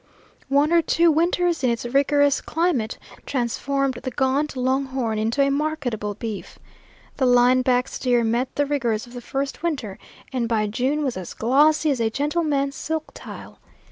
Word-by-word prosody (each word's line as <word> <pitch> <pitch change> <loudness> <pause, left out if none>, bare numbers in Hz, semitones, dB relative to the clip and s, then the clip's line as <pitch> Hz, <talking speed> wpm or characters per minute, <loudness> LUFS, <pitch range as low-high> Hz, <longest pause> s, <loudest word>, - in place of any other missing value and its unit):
One 285 +4 +3
or 340 - +6
two 335 +1 +3
winters 340 +1 +1
in 250 - +3
its 235 0 -2
rigorous 280 +2 +2
climate 320 -10 -1 0.3
transformed 270 +1 -1
the - - -3
gaunt 270 +3 0
long 260 +2 +1
horn 245 -5 -2
into 230 +6 +1
a 275 - +2
marketable 275 -9 -2
beef. 215 -1 -6 0.6
The 260 - +2
line 245 +1 +5
back 250 0 +2
steer 245 -2 0
met 235 +3 -1
the 290 - +1
rigors 240 -7 -1
of 240 - -15
the 245 - -7
first 275 +3 -4
winter 275 - -3 0.3
and 240 -3 -1
by 220 -2 +1
June 260 +8 -1
was 260 -8 -2
as 185 -2 -7
glossy 300 +6 +3
as 265 - -1
a 225 - +2
gentleman's 285 +1 -1
silk 320 +1 -4
tile. - - -10
265 Hz, 170 wpm, -23 LUFS, 240-295 Hz, 0.6 s, or